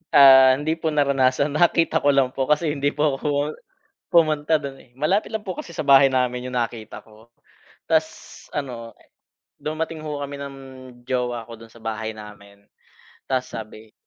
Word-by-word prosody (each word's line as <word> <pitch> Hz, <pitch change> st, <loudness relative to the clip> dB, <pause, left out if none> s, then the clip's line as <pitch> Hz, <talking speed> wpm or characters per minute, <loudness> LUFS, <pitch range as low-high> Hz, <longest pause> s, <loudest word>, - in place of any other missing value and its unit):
Ah, 130 Hz, -1 st, +8 dB
hindi 155 Hz, +4 st, -2 dB
po 160 Hz, -, -2 dB
naranasan 140 Hz, -2 st, +2 dB
nakita 165 Hz, +2 st, +2 dB
ko 145 Hz, -1 st, +2 dB
lang 130 Hz, -2 st, +2 dB
po 130 Hz, -1 st, -2 dB
kasi 150 Hz, +1 st, +1 dB
hindi 145 Hz, 0 st, -1 dB
po 145 Hz, -2 st, 0 dB
ako 145 Hz, 0 st, -1 dB, 0.6 s
pumunta 155 Hz, -2 st, +3 dB
don 140 Hz, -1 st, -7 dB
eh, 120 Hz, -2 st, -20 dB
malapit 185 Hz, -, 0 dB
lang 220 Hz, -, -2 dB
po 185 Hz, -4 st, -6 dB
kasi 170 Hz, -, -8 dB
sa -, -, -3 dB
bahay 135 Hz, -2 st, +5 dB
namin 125 Hz, -1 st, 0 dB
yung 125 Hz, -, -6 dB
nakita 115 Hz, -2 st, -4 dB
ko. 110 Hz, +2 st, -21 dB, 0.6 s
'Tas -, -, -2 dB
ano 120 Hz, -5 st, -5 dB, 0.7 s
dumating 160 Hz, +1 st, -4 dB
ho 145 Hz, -1 st, -4 dB
kami 140 Hz, 0 st, -6 dB
ng 140 Hz, 0 st, -7 dB, 0.5 s
jowa 125 Hz, -2 st, -2 dB
ko 115 Hz, -, -9 dB
don 115 Hz, -, -13 dB
sa 115 Hz, -, -17 dB
bahay 110 Hz, 0 st, -4 dB
namin. 100 Hz, -1 st, -13 dB, 0.7 s
'Tas 130 Hz, -1 st, -1 dB
sabi, 110 Hz, 0 st, -9 dB
135 Hz, 165 wpm, -22 LUFS, 120-150 Hz, 0.7 s, Ah